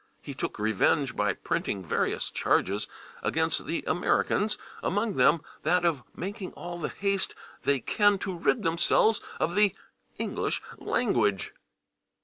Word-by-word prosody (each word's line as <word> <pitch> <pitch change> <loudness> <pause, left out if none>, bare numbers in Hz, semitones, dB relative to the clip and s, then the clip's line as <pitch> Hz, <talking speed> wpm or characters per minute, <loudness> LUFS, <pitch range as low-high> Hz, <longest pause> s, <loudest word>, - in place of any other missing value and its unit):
He - - -8
took - - -4
revenge 110 +6 +2
by 105 -1 +1
printing 95 -2 -2
various - - -1
charges 100 +3 +1 0.3
against - - 0
the - - -2
Americans, 210 +1 +1 0.2
among 205 +2 0
them 145 +2 +4 0.2
that 175 +3 +2
of 160 -6 +2
"making 195 +1 -5
all 175 0 -7
the 165 - -2
haste 200 -1 -1 0.3
they 140 -1 +3
can 205 - +3
to 190 -1 -4
rid 210 +6 +1
themselves 170 +6 +3 0.2
of 170 - 0
the 205 0 +4 0.4
[English] - - -1 0.2
language." 105 - +1
175 Hz, 130 wpm, -28 LUFS, 125-200 Hz, 0.4 s, them